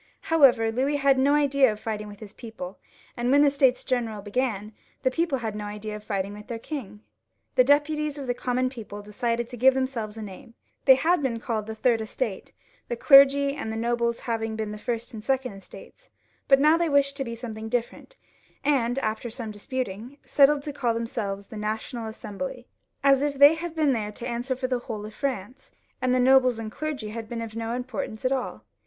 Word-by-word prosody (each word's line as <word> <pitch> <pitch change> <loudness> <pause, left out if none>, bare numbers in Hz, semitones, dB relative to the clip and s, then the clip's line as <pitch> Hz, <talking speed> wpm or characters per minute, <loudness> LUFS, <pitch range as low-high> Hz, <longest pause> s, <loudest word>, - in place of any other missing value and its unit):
However, 250 -8 +5
Louis 265 +5 0
had 275 -2 +3
no 280 +2 +4
idea 280 -4 +4
of 210 - -7
fighting 215 -1 -4
with 205 0 -12
his 210 -1 -10
people, 220 -6 -8 0.4
and 240 0 -1
when 285 +2 +6
the 285 - +5
States 265 -3 +3
General 225 -5 -2
began, 215 -1 -2 0.3
the 260 - +3
people 330 -1 0
had 220 -4 -4
no 210 0 -5
idea 210 +1 -6
of 210 - -9
fighting 200 -1 -2
with 210 0 -11
their 235 -2 -4
king. 225 -6 -7 0.5
The 255 - +5
deputies 295 +2 +2
of 280 - -5
the 245 - 0
com 245 0 -3
mon 255 0 +1
people 210 -5 -8
decided 230 +3 -2
to 245 0 -9
give 260 +2 +5
themselves 240 -5 -2
a 220 - -5
name. 210 +4 -11 0.3
They 265 - +9
had 335 +5 +2
been 245 -4 -1
called 220 -3 -3
the 220 - -5
Third 230 0 +2
Estate, 220 - -4 0.4
the 240 - -2
clergy 275 +2 +6
and 220 - -4
the - - -4
nobles 235 0 0
having 225 -2 -2
been 220 -1 -3
the 210 - -7
First 235 +1 -3
and 220 - -7
the - - -22
Second 265 -4 0
Estates, 195 - -14 0.4
but 270 - +7
they 275 - +1
now 310 +2 +6
wished 280 -2 +2
for 235 -2 -5
something 220 -2 -6
different, 245 - -3 0.5
and 265 -4 +1
after 220 -1 -2
some 225 -1 -6
disputing, 235 +3 -5
settled 285 0 +4
to 295 - -5
caU 240 -4 0
themselves 210 -4 -3
the 215 - -10
National 220 +2 -4
Assembly, 245 +4 -6 0.4
as 275 -1 +5
if 290 -1 0
they 285 +3 +8
had 330 0 -5
been 300 -4 +3
there 210 -3 -2
to 235 - -6
answer 245 +2 -2
for 255 +1 -4
the 255 -1 0
whole 215 -3 -6
of 215 - -9
France, 260 0 -4 0.3
and 255 - +1
the 255 - +3
nobles 255 -1 +5
and 220 -1 -5
clergy 290 -6 -4
had 220 0 -7
been 230 -1 -4
of 220 -1 -8
no 230 0 -3
importance 245 -2 -5
at 255 - +2
all. 265 -2 -3
240 Hz, 210 wpm, -26 LUFS, 220-270 Hz, 0.5 s, They